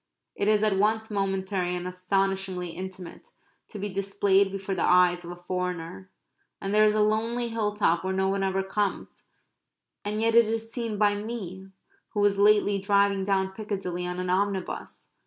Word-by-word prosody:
It 200 Hz, -, -2 dB
is 215 Hz, 0 st, +3 dB
at 210 Hz, -3 st, +2 dB
once 220 Hz, +2 st, +1 dB
momentary 190 Hz, -2 st, -1 dB
and 180 Hz, 0 st, -4 dB
astonishingly 190 Hz, 0 st, -1 dB
intimate 185 Hz, 0 st, -8 dB, 0.4 s
to 215 Hz, -, -9 dB
be 205 Hz, +1 st, -3 dB
displayed 195 Hz, 0 st, +1 dB
before 195 Hz, 0 st, -4 dB
the 185 Hz, -, -2 dB
eyes 180 Hz, 0 st, +4 dB
of 170 Hz, -, -8 dB
a 175 Hz, -, -6 dB
foreigner. 180 Hz, 0 st, -4 dB, 0.5 s
And 195 Hz, +1 st, -3 dB
there 215 Hz, 0 st, +6 dB
is 210 Hz, 0 st, +3 dB
a 215 Hz, -, +3 dB
lonely 230 Hz, +3 st, 0 dB
hill 220 Hz, -2 st, -1 dB
top 170 Hz, -5 st, +2 dB
where 190 Hz, -, -1 dB
no 190 Hz, 0 st, +1 dB
one 195 Hz, 0 st, 0 dB
ever 195 Hz, 0 st, 0 dB
comes, 200 Hz, +1 st, -3 dB, 0.8 s
and 210 Hz, +1 st, -2 dB
yet 225 Hz, +1 st, +2 dB
it 235 Hz, 0 st, +7 dB
is 225 Hz, +1 st, -3 dB
seen 230 Hz, -4 st, -3 dB
by 205 Hz, 0 st, +3 dB
me 205 Hz, -3 st, -6 dB, 0.5 s
who -, -, 0 dB
was 205 Hz, -1 st, +3 dB
lately 205 Hz, -1 st, +4 dB
driving 200 Hz, 0 st, +2 dB
down 190 Hz, -1 st, 0 dB
Piccadilly 190 Hz, -4 st, -4 dB
on 180 Hz, 0 st, -4 dB
an 180 Hz, 0 st, -1 dB
omnibus. 195 Hz, 0 st, -2 dB
195 Hz, 175 wpm, -27 LUFS, 185-210 Hz, 0.8 s, it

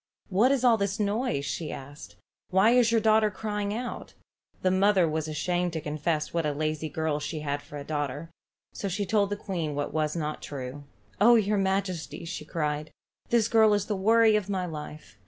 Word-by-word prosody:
"What 215 Hz, +7 st, +4 dB
is 270 Hz, -3 st, +1 dB
all 240 Hz, -3 st, +5 dB
this 200 Hz, 0 st, -2 dB
noise?" 205 Hz, -, 0 dB
she 160 Hz, +2 st, -3 dB
asked. 140 Hz, +2 st, -10 dB, 0.3 s
"Why 190 Hz, +5 st, +4 dB
is 245 Hz, -2 st, +4 dB
your 230 Hz, -, +4 dB
daughter 215 Hz, 0 st, +4 dB
crying 205 Hz, 0 st, -3 dB
out?" 240 Hz, +3 st, -5 dB, 0.5 s
The 185 Hz, -, +3 dB
mother 190 Hz, -1 st, +4 dB
was 155 Hz, 0 st, -2 dB
ashamed 175 Hz, +3 st, -1 dB
to 160 Hz, -, -2 dB
confess 155 Hz, +1 st, -2 dB
what 170 Hz, -1 st, 0 dB
a 150 Hz, -1 st, 0 dB
lazy 155 Hz, +1 st, -2 dB
girl 155 Hz, 0 st, -1 dB
she 155 Hz, +1 st, -4 dB
had 145 Hz, -1 st, -2 dB
for 145 Hz, -, -10 dB
a 140 Hz, -, -6 dB
daughter, 145 Hz, +1 st, -4 dB, 0.4 s
so 200 Hz, -, -4 dB
she 200 Hz, +2 st, -2 dB
told 200 Hz, +1 st, +2 dB
the 205 Hz, -, -1 dB
queen 170 Hz, -8 st, -3 dB
what 145 Hz, 0 st, -3 dB
was 155 Hz, 0 st, 0 dB
not 155 Hz, -2 st, -3 dB
true. 140 Hz, 0 st, -7 dB, 0.3 s
"Oh, 235 Hz, +4 st, +7 dB
your 210 Hz, -2 st, +2 dB
majesty," 190 Hz, -3 st, -2 dB, 0.2 s
cried 150 Hz, -2 st, -2 dB
she, -, -, -23 dB, 0.4 s
"this 230 Hz, -2 st, +3 dB
girl 220 Hz, -2 st, +5 dB
is 205 Hz, -1 st, -1 dB
the 210 Hz, -, -2 dB
worry 220 Hz, +3 st, +4 dB
of 205 Hz, -2 st, -1 dB
my 190 Hz, -2 st, -1 dB
life. 150 Hz, -7 st, -8 dB
180 Hz, 195 wpm, -27 LUFS, 150-210 Hz, 0.5 s, Oh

